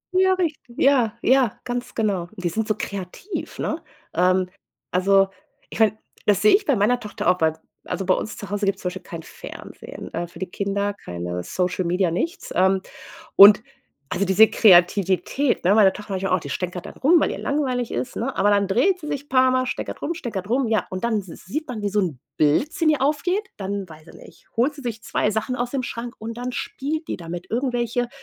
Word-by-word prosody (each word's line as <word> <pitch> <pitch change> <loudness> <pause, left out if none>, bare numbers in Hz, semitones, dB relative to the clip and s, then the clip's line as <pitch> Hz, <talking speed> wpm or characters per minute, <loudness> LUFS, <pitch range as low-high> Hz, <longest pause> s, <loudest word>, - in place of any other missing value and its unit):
Ja, 375 0 +5
richtig. 310 -9 -3
Ja, 245 -5 +3
ja, 260 -4 +3
ganz 245 0 -4
genau. 195 -6 -1
Die 180 -3 -2
sind 220 +5 -2
so 215 - +1
kreativ, 200 - -6
ne? - - -2 0.3
Ähm, 185 0 +3 0.4
also, 195 +1 +4 0.4
ich - - -8
meine, 215 -1 +4 0.3
das 205 -1 +4
sehe 215 - +7
ich 405 - 0
bei 280 - +3
meiner 230 +4 +2
Tochter 210 -6 -5
auch, 180 -1 +2
weil 160 0 +3 0.3
also 195 - -3
bei 185 - +4
uns 215 - -4
zu 205 - -8
Hause 205 0 -1
gibt's 195 - 0
zum 180 - 0
Beispiel 185 +1 -8
kein 165 -1 -8
Fernsehen, - - -10
äh, 170 +1 -3
für 170 - -14
die 190 - -2
Kinder 200 +2 -1
keine 90 - -5
Social 180 - -1
Media, 180 0 +1
nichts, 330 - -3
ähm, 190 +1 +3 0.6
und 205 +2 +10 0.5
also, 200 - 0
diese 195 +4 +7
Kreativität, 195 +7 +3
ne, 190 +3 +5
meine 205 -3 +6
Tochter 210 0 -8
manchmal 190 0 -1
auch 185 - +4
die 145 -3 -8
stänkert 180 +5 -4
dann - - -10
rum, 330 +6 +4
weil - - +1
ihr - - -5
langweilig 255 -4 -1
ist, 250 - -3
ne, 260 +4 -3
aber 205 +2 +3
dann 200 -1 +2
dreht 290 - +2
sie 300 - -7
sich 285 -1 -4
paarmal, 255 0 +3
stänkert - - -5
rum, 335 - -1
stänkert 220 - -5
rum, 250 +1 +1
ja 220 -3 +1
und 185 0 -5
dann 235 -2 +1
s 195 - -6 0.2
sieht 305 - -3
man, 240 -4 -5
wie 205 - 0
so 210 +1 +1
'n 170 -9 -2 0.2
Blitz 155 - +2
in 315 - +5
ihr 300 -3 +1
aufgeht, 355 +8 0
dann 195 -1 -4
weiß 155 0 -14
ich - - -14
nicht, - - -16
holt 260 +6 +2
sie 285 - -11
sich 225 -3 -4
2 210 - 0
Sachen 220 +4 -2
aus 245 0 -2
dem 270 -2 -2
Schrank 240 0 -5
und 225 +1 -6
dann 245 +1 -4
spielt 310 +6 -4
die - - -2
damit, 175 0 -7
irgendwelche 245 -1 -1
210 Hz, 215 wpm, -23 LUFS, 185-255 Hz, 0.6 s, und